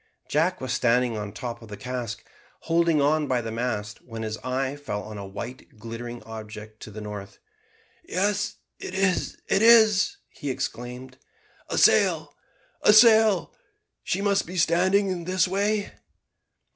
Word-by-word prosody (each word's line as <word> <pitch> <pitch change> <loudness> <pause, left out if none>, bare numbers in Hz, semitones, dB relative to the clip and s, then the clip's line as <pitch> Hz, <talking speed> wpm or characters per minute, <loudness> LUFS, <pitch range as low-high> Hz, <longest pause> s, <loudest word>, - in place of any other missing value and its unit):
Jack 165 +5 +1
was 130 -1 -3
standing 120 0 +2
on 105 -1 -4
the 100 - -11
top 120 -2 -6
of 115 - -12
the 105 -1 -8
cask, 125 0 -5 0.4
holding 165 -1 +2
on 150 +1 +2
by 125 -2 +1
the 115 -1 -5
mast, 110 -3 -3
when 115 -2 -7
his 110 -1 -3
eye 130 +3 -2
fell 105 -9 -5
on 105 0 -8
a 100 - -7
white 110 +4 -9
glittering 115 +2 -7
object 110 -1 -9
to - - -9
the 105 +1 -8
northward. 105 -2 -8 0.7
"Yes, 205 - -1 0.2
it 185 - -6
is! 190 -2 0
it 195 - +2
is!" 225 - +6
he 145 - -6
exclaimed; 125 +1 -5 0.5
"a - - -2
sail! - - +3 0.5
a 210 - +6
sail! 220 -3 +6 0.5
she 195 +3 -1
must 200 -3 +1
be 180 +2 -6
standing 185 +1 +2
this 185 +1 +2
way." 205 +2 0
130 Hz, 155 wpm, -25 LUFS, 115-185 Hz, 0.7 s, is